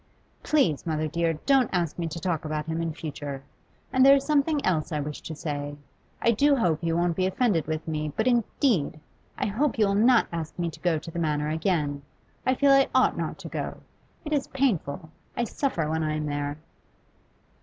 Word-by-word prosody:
Please, 225 - +2
mother 155 -1 0
dear, 165 +1 0
don't 270 -4 +4
ask 175 -3 -1
me 170 - -1
to 165 +1 -5
talk 170 -3 -1
about 155 -1 -3
him 160 +1 -2
in 165 -1 -1
future. 145 -3 -6 0.5
And 260 - +5
there 275 +1 +9
is 275 - +1
something 295 0 +1
else 165 -3 0
I 150 - -1
wish 150 +1 -5
to 160 - -7
say. 145 -2 -4 0.5
I 230 - +5
do 280 +6 +4
hope 170 - +1
you 165 0 +1
won't 175 -1 +1
be 185 +1 +1
offended 190 - +1
with 155 0 -3
me, 155 -1 -2
but 220 - +1
indeed 235 - +1 0.4
I - - -2
I - - +1
hope 250 +5 0
you 215 - +4
will 200 - +1
not 230 +4 +5
ask 165 -2 -5
me 170 -2 -1
to - - -13
go 175 -3 +1
to 165 +2 -8
the 170 - -4
Manor 150 -2 0
again. 155 -3 0 0.5
I 255 - +4
feel 280 +1 +4
I 275 0 +5
ought - - +4
not - - -3
to - - -9
go. - - -4 0.5
It 305 - -2
is 285 -2 0
painful; 175 - -1 0.3
I 240 - +1
suffer 230 - -1
when 160 +1 -1
I 155 -1 -1
am 155 0 -2
there. 145 0 -3
165 Hz, 210 wpm, -26 LUFS, 155-235 Hz, 0.5 s, there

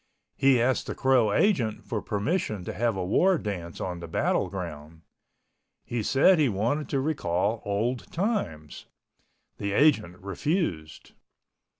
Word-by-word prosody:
He 135 -2 +4
asked 125 +2 +1
the - - -4
Crow 130 -5 +3
agent 120 - +1
for 110 -3 -3
permission 105 - -2
to - - -4
have 115 -2 0
a 90 - -2
war 180 - +3
dance 90 - -5
on 90 -2 -4
the 85 - -7
battle 80 - 0
ground. 75 +2 -7 0.8
He 120 -1 -2
said 145 - +4
he 145 -4 +3
wanted 115 +9 -1
to 140 - 0
recall 110 - -1
old 110 +5 -2
times. 105 - -3 0.7
The 100 -1 -2
agent 110 - +3
refused. 95 - -3
110 Hz, 135 wpm, -27 LUFS, 90-140 Hz, 0.8 s, He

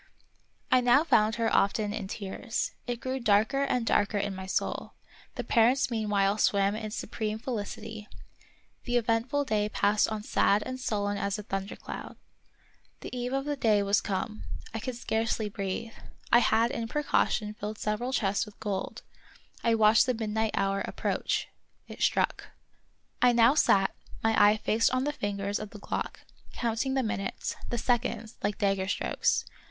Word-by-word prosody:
I 255 - +6
now 245 +4 +5
found 215 -9 +3
her 230 -1 +1
often 205 +1 +2
in 210 -3 -4
tears. 210 +4 -3 0.2
It 240 -1 -2
grew 260 +1 -3
darker 220 +4 +3
and 250 -4 0
darker 205 -1 +2
in 200 0 -1
my 190 0 -7
soul; - - -2 0.4
the - - -3
parents 245 +3 +3
meanwhile 210 -2 +1
swam 200 0 +3
in 215 0 -4
supreme 215 0 -3
felicity; 220 -2 -5 0.8
the 245 0 +1
eventful 240 +5 +1
day 210 -4 0
passed 210 0 +2
on 215 -1 -4
sad 205 0 +2
and 255 0 -5
sullen 205 -4 -1
as 200 0 -1
a 210 - -6
thundercloud. 195 0 -6 0.9
The - - -7
eve 245 0 -3
of 270 +1 -1
the 295 0 -1
day 215 -6 +3
was 200 +1 +2
come. 205 +2 -3 0.3
I 225 - -2
could 250 +2 -4
scarcely 225 -2 -1
breathe. 200 +3 -4 0.4
I 235 - +8
had 230 0 +3
in 230 -1 -3
precaution 225 -6 0
filled 210 0 -6
several 215 +5 -2
chests 200 -6 +1
with 210 - -14
gold. 200 -3 -4 0.6
I 230 -1 +3
watched 220 +1 +5
the 255 - +1
midnight 220 0 -1
hour 195 0 0
approach. - - -1 0.4
It - - -10
struck. - - +1 0.7
I 245 0 +6
now 235 +2 +6
sat, 195 -10 +3 0.3
my 225 0 +3
eye 210 +1 +6
fixed 220 +1 +2
on 255 - +1
the 295 +1 -1
fingers 200 -3 -2
of 215 - -6
the 210 - -11
clock, - - -4 0.3
counting 235 +3 -1
the 265 - +2
minutes, 195 -3 -3
the 240 - -2
seconds, 230 -2 -1
like 205 0 -1
dagger 195 -2 +1
strokes. - - 0
220 Hz, 165 wpm, -29 LUFS, 205-240 Hz, 0.9 s, I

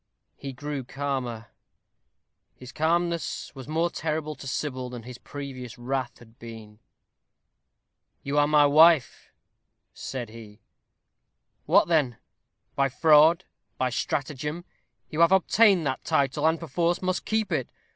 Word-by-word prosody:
He 140 - -7
grew 145 +1 -5
calmer; 130 -4 -4 1.1
his 125 0 -12
calmness 170 +2 -1
was 135 -2 -10
more 165 +3 0
terrible 155 -1 -3
to 140 - -10
Sybil 130 -2 -3
than 120 -2 -8
his 125 +1 -10
previous 130 -4 -8
wrath 130 0 -3
had 115 -1 -19
been. 110 -2 -11 1.4
"You 140 +1 0
are 145 - +4
my 150 -1 +5
wife," 155 0 +4 0.6
said 125 -4 -6
he; 110 -1 -13 1.1
"what - - +5
then? 150 -8 +1 0.6
By 140 0 +2
fraud, 160 +5 +5 0.3
by 130 -1 0
stratagem, 150 +6 -3 0.5
you 155 - -4
have 170 +1 +5
obtained 190 -1 +4
that 130 -1 -2
title, 140 +2 +1
and, 160 0 +1
perforce, 170 +2 -1
must 185 0 -1
keep 220 -1 -1
it. - - -1
145 Hz, 125 wpm, -26 LUFS, 125-160 Hz, 1.4 s, my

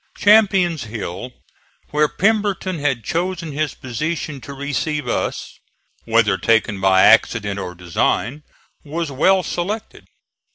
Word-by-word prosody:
Champion's 195 - +4
Hill, 110 +1 -6 0.6
where 150 0 +3
Pemberton 200 -2 0
had 140 -5 -1
chosen 170 - -2
his 150 +1 -2
position 145 +3 -4
to 140 - -9
receive 145 +1 -2
us, - - -3 0.5
whether 110 -4 +2
taken 110 -2 +1
by 95 -1 +5
accident 105 -3 +3
or 90 -2 -6
design, 90 - -1 0.4
was 160 +1 -4
well 185 +8 +3
selected. 205 +7 -5
145 Hz, 115 wpm, -20 LUFS, 115-175 Hz, 0.6 s, by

